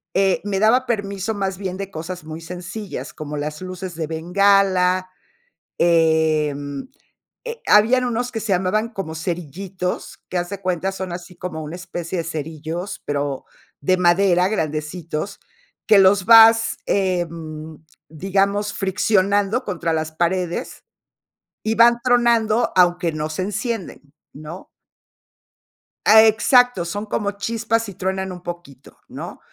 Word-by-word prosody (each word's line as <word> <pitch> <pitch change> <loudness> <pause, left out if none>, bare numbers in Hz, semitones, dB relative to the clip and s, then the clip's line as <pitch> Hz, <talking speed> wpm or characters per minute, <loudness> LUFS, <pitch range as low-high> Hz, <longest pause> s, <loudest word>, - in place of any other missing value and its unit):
eh, 195 -1 +2
me 195 -2 -1
daba 245 +5 +4
permiso, 200 -1 -2
más 195 -2 -3
bien, 190 -2 -4
de 195 0 -5
cosas 170 +2 -7
muy 160 +1 -7
sencillas, 180 - -7
como 150 -1 -6
las 150 +3 -4
luces 185 -1 -6
de 160 -2 -3
bengala, 185 +2 +2 0.7
em, 160 - +1 0.6
eh, 470 -1 -6
habían 230 +5 +5
unos 245 +1 -2
que 225 - -3
se 205 -3 -1
llamaban 195 +5 0
como 195 -8 -6
cerillitos, 180 +2 -4
que 185 - -2
haz 175 +1 -4
de 200 -1 -6
cuenta 185 +1 -1
son 190 -2 -5
así 180 0 -9
como 160 -3 -6
una 150 +3 -7
especie 175 -1 -5
de 165 - -1
cerillos, 160 +3 -5
pero 145 -2 -2 0.4
de 185 +6 +2
madera 180 0 +3
grandecitos, 160 0 -3 0.5
que 210 -2 +7
los 190 0 +5
vas, 225 0 +7
em, 165 -5 -2 0.3
digamos, 195 +5 0
friccionando 200 +3 +1
contra 170 -4 -2
las 160 0 -2
paredes, 175 +1 -2 0.8
y 220 +1 +1
van 235 +1 +6
tronando, 235 -2 +2
aunque 175 -2 +3
no 155 0 -3
se 170 +4 -3
encienden, 220 -1 -4 0.3
¿no? 155 +5 -10 1.4
Ah, 220 +1 +8
exacto, 235 -2 +4
son 205 +5 -4
como 205 -1 -2
chispas, 225 +1 -1
y - - -8
truenan 190 +1 -3
un 180 -1 -9
poquito, 170 -7 -10
¿no? - - -8
185 Hz, 135 wpm, -21 LUFS, 165-205 Hz, 1.4 s, Ah